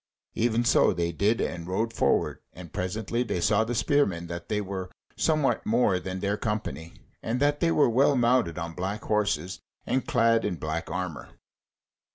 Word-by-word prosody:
Even 120 Hz, +1 st, +1 dB
so -, -, +4 dB
they 85 Hz, -1 st, -1 dB
did, 105 Hz, +7 st, +1 dB
and 85 Hz, -1 st, -3 dB
rode 110 Hz, +5 st, -1 dB
forward, -, -, +1 dB
and 85 Hz, -3 st, -11 dB
presently 105 Hz, +5 st, -2 dB
they 115 Hz, -7 st, -1 dB
saw 105 Hz, +5 st, +3 dB
the 120 Hz, +2 st, -3 dB
spearmen 100 Hz, -11 st, +1 dB
that 85 Hz, 0 st, -7 dB
they 105 Hz, -, 0 dB
were 95 Hz, -2 st, -5 dB, 0.3 s
somewhat 155 Hz, -4 st, +1 dB
more 110 Hz, -5 st, +2 dB
than 95 Hz, 0 st, -5 dB
their 100 Hz, +1 st, 0 dB
company, 105 Hz, -7 st, -4 dB, 0.3 s
and 115 Hz, +3 st, -2 dB
that 145 Hz, +1 st, +2 dB
they 170 Hz, -, +2 dB
were 150 Hz, -, +4 dB
well 135 Hz, +4 st, +3 dB
mounted 120 Hz, -8 st, +2 dB
on 85 Hz, -1 st, -4 dB
black 95 Hz, +5 st, -4 dB
horses 95 Hz, -5 st, -1 dB, 0.3 s
and 130 Hz, -, -1 dB
clad 115 Hz, 0 st, +3 dB
in 100 Hz, -3 st, -1 dB
black 80 Hz, 0 st, -4 dB
armour. 90 Hz, -6 st, -4 dB
105 Hz, 175 wpm, -27 LUFS, 90-115 Hz, 0.3 s, so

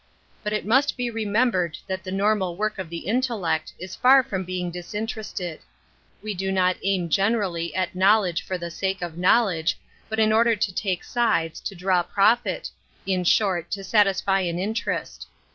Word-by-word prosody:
But 210 Hz, -, -2 dB
it 210 Hz, -, -2 dB
must 265 Hz, +7 st, +3 dB
he 245 Hz, -1 st, -2 dB
remem 225 Hz, +2 st, +1 dB
bered 175 Hz, -5 st, -1 dB
that 190 Hz, 0 st, -4 dB
the 185 Hz, -, -6 dB
normal 195 Hz, -2 st, +1 dB
work 215 Hz, 0 st, -2 dB
of 185 Hz, -4 st, -5 dB
the 170 Hz, -1 st, -6 dB
intellect 210 Hz, -8 st, -1 dB
is 185 Hz, +1 st, -8 dB
far 260 Hz, +1 st, +6 dB
from 195 Hz, -8 st, -3 dB
being 180 Hz, -1 st, -3 dB
disinterested. 185 Hz, -1 st, -5 dB, 0.6 s
We 215 Hz, -1 st, -3 dB
do 190 Hz, 0 st, -2 dB
not 185 Hz, -1 st, +2 dB
1 195 Hz, -1 st, +1 dB
Metaphysics 165 Hz, -3 st, +1 dB
41 200 Hz, -4 st, 0 dB
aim 165 Hz, -2 st, -3 dB
genemlly^t 185 Hz, -2 st, 0 dB
knowledge 190 Hz, -2 st, +3 dB
for 185 Hz, -, -4 dB
the 170 Hz, -1 st, -6 dB
sake 190 Hz, +1 st, -2 dB
of 170 Hz, -1 st, -6 dB
knowledge, 180 Hz, -3 st, +2 dB, 0.3 s
but 220 Hz, -, -3 dB
in 215 Hz, 0 st, +3 dB
order 230 Hz, +1 st, +4 dB
to 200 Hz, -2 st, -1 dB
take 185 Hz, -2 st, -2 dB
sides, 220 Hz, -10 st, 0 dB
to 200 Hz, -, -6 dB
draw 180 Hz, 0 st, +2 dB
profit— 205 Hz, +3 st, +1 dB, 0.3 s
in 185 Hz, -1 st, 0 dB
short, 175 Hz, -2 st, +2 dB
to 195 Hz, 0 st, -4 dB
satisfy 195 Hz, -2 st, +2 dB
an 175 Hz, -2 st, -2 dB
inter 215 Hz, +6 st, -1 dB
est. -, -, -7 dB
195 Hz, 185 wpm, -24 LUFS, 180-215 Hz, 0.6 s, far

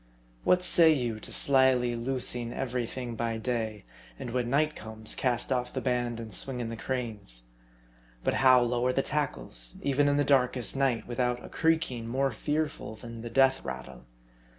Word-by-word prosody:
What 180 Hz, 0 st, +3 dB
say 165 Hz, -2 st, +7 dB
you 120 Hz, -7 st, -1 dB
to -, -, -10 dB
slyly 130 Hz, -3 st, +3 dB
loosing 120 Hz, -1 st, -2 dB
every 125 Hz, -2 st, -2 dB
thing 125 Hz, -1 st, -5 dB
by 115 Hz, 0 st, -2 dB
day; 110 Hz, -2 st, -3 dB, 0.3 s
and 120 Hz, -, -6 dB
when 120 Hz, -1 st, -1 dB
night 150 Hz, +3 st, +1 dB
comes, 110 Hz, 0 st, -5 dB
cast 125 Hz, 0 st, 0 dB
off 125 Hz, -1 st, 0 dB
the -, -, -2 dB
band 120 Hz, -2 st, -1 dB
and 110 Hz, -2 st, -8 dB
swing 130 Hz, -2 st, -2 dB
in 115 Hz, -2 st, -3 dB
the 115 Hz, -, -5 dB
cranes? 110 Hz, -, -5 dB, 0.8 s
But -, -, +1 dB
how 130 Hz, -1 st, +6 dB
lower 120 Hz, +1 st, +1 dB
the 135 Hz, +1 st, 0 dB
tackles, -, -, -2 dB
even 140 Hz, +1 st, +2 dB
in 145 Hz, 0 st, +2 dB
the 145 Hz, -, +3 dB
darkest 125 Hz, -4 st, +2 dB
night, 135 Hz, -4 st, 0 dB
with 120 Hz, 0 st, -6 dB
out 125 Hz, -1 st, 0 dB
a -, -, -10 dB
creaking 160 Hz, -8 st, 0 dB
more 135 Hz, +3 st, 0 dB
fearful 150 Hz, -8 st, -3 dB
than 115 Hz, +1 st, -9 dB
the 120 Hz, -, -6 dB
death 135 Hz, +2 st, +3 dB
rattle 65 Hz, -2 st, -8 dB
125 Hz, 175 wpm, -29 LUFS, 115-135 Hz, 0.8 s, say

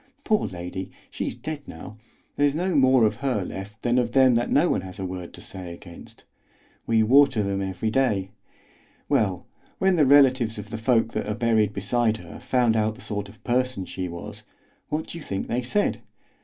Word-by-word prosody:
Poor 215 Hz, -2 st, +1 dB
lady, 90 Hz, +1 st, -6 dB, 0.2 s
she's -, -, -3 dB
dead 155 Hz, -2 st, -6 dB
now; 80 Hz, +6 st, -9 dB, 0.4 s
there's 145 Hz, 0 st, +2 dB
no 180 Hz, +3 st, 0 dB
more 130 Hz, -3 st, +5 dB
of 105 Hz, -, 0 dB
her 125 Hz, -9 st, -1 dB
left 100 Hz, +4 st, -8 dB
than 120 Hz, +1 st, +2 dB
of 120 Hz, -1 st, -1 dB
them 130 Hz, -2 st, +6 dB
that 120 Hz, +1 st, +1 dB
no 155 Hz, +5 st, +4 dB
one -, -, +1 dB
has 95 Hz, -1 st, -9 dB
a 95 Hz, -, -4 dB
word 90 Hz, -1 st, -6 dB
to -, -, -13 dB
say 90 Hz, -2 st, -7 dB
against. 85 Hz, -1 st, -13 dB, 0.6 s
We 115 Hz, -1 st, +3 dB
water 130 Hz, -1 st, +5 dB
them 100 Hz, 0 st, -1 dB
every 95 Hz, +3 st, -2 dB
day. 105 Hz, -7 st, +1 dB, 0.8 s
Well, 95 Hz, -4 st, +1 dB, 0.3 s
when 190 Hz, -1 st, +2 dB
the 150 Hz, -, +5 dB
relatives 130 Hz, -5 st, +5 dB
of 105 Hz, +2 st, -8 dB
the 110 Hz, -, -4 dB
folk 115 Hz, -1 st, +2 dB
that -, -, -2 dB
are 105 Hz, -, -2 dB
buried 110 Hz, -3 st, +2 dB
beside 110 Hz, +3 st, 0 dB
her -, -, -11 dB
found 120 Hz, -3 st, +2 dB
out 110 Hz, 0 st, +1 dB
the 125 Hz, -, -14 dB
sort 105 Hz, -3 st, -4 dB
of 105 Hz, -, -18 dB
person 125 Hz, -5 st, 0 dB
she 90 Hz, 0 st, -4 dB
was, 85 Hz, 0 st, -8 dB, 0.5 s
what 155 Hz, +1 st, -2 dB
do 170 Hz, -, -8 dB
you -, -, -10 dB
think 95 Hz, -6 st, -3 dB
they 125 Hz, -, -1 dB
said? 205 Hz, +12 st, 0 dB
115 Hz, 195 wpm, -25 LUFS, 100-130 Hz, 0.8 s, them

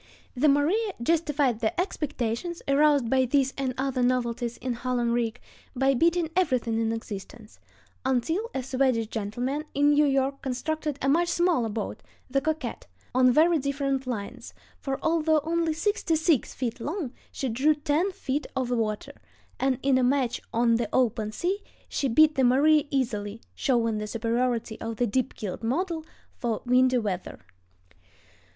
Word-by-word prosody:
The 285 Hz, +4 st, +3 dB
Maria 365 Hz, +10 st, +2 dB
justified 295 Hz, -6 st, +1 dB
the 225 Hz, +7 st, -1 dB
expectations 300 Hz, -, -2 dB
aroused 285 Hz, -2 st, +4 dB
by 260 Hz, +2 st, +3 dB
these 270 Hz, +1 st, +1 dB
and 260 Hz, -2 st, -2 dB
other 265 Hz, -1 st, -1 dB
novelties 240 Hz, -1 st, 0 dB
in 255 Hz, 0 st, -3 dB
hull 250 Hz, +1 st, -2 dB
and 235 Hz, -1 st, +1 dB
rig 235 Hz, 0 st, -1 dB, 0.4 s
by 270 Hz, +2 st, +3 dB
beating 335 Hz, +4 st, +2 dB
everything 255 Hz, -10 st, +1 dB
in 225 Hz, 0 st, 0 dB
existence, 215 Hz, 0 st, -7 dB, 0.4 s
until 320 Hz, -, 0 dB
a 265 Hz, -, -1 dB
Swedish 255 Hz, -3 st, +1 dB
gentleman 240 Hz, +7 st, -3 dB
in 290 Hz, +1 st, +4 dB
New 295 Hz, 0 st, +4 dB
York 275 Hz, 0 st, 0 dB
constructed 300 Hz, +3 st, -3 dB
a -, -, +1 dB
much 335 Hz, +5 st, +3 dB
smaller 345 Hz, -9 st, +2 dB
boat, 215 Hz, -1 st, -4 dB, 0.3 s
the 275 Hz, +1 st, +2 dB
Coquette, 315 Hz, +1 st, -3 dB, 0.3 s
on 255 Hz, 0 st, +5 dB
very 320 Hz, +5 st, +4 dB
different 275 Hz, -1 st, -1 dB
lines, 240 Hz, +1 st, -5 dB, 0.2 s
for 270 Hz, -1 st, -3 dB
although 320 Hz, -1 st, +3 dB
only 330 Hz, 0 st, 0 dB
sixty 350 Hz, 0 st, 0 dB
six 315 Hz, -4 st, +2 dB
feet 245 Hz, -1 st, -3 dB
long 295 Hz, -, -4 dB, 0.2 s
she 270 Hz, -, -3 dB
drew 265 Hz, +6 st, +2 dB
ten 300 Hz, +6 st, 0 dB
feet 290 Hz, -4 st, -3 dB
of 255 Hz, -2 st, -1 dB
water; 220 Hz, -3 st, -2 dB, 0.4 s
and 265 Hz, -1 st, +1 dB
in 265 Hz, -1 st, +3 dB
a -, -, +2 dB
match 255 Hz, -1 st, +1 dB
on 230 Hz, 0 st, +3 dB
the 230 Hz, -3 st, -2 dB
open 225 Hz, -4 st, +1 dB
sea 360 Hz, -, -1 dB, 0.3 s
she 275 Hz, -, -1 dB
beat 305 Hz, +5 st, +5 dB
the 270 Hz, -3 st, +1 dB
Maria 290 Hz, +4 st, +4 dB
easily, 225 Hz, -6 st, -2 dB
showing 230 Hz, -5 st, +1 dB
the 210 Hz, -, -4 dB
superiority 230 Hz, 0 st, -1 dB
of 225 Hz, 0 st, -4 dB
the 245 Hz, -, +1 dB
deep 250 Hz, +3 st, -1 dB
keeled 205 Hz, -1 st, -5 dB
model 320 Hz, +8 st, -1 dB, 0.4 s
for 235 Hz, -4 st, -2 dB
windy 255 Hz, +1 st, +4 dB
weather. 200 Hz, -6 st, -3 dB
260 Hz, 160 wpm, -27 LUFS, 235-300 Hz, 0.4 s, on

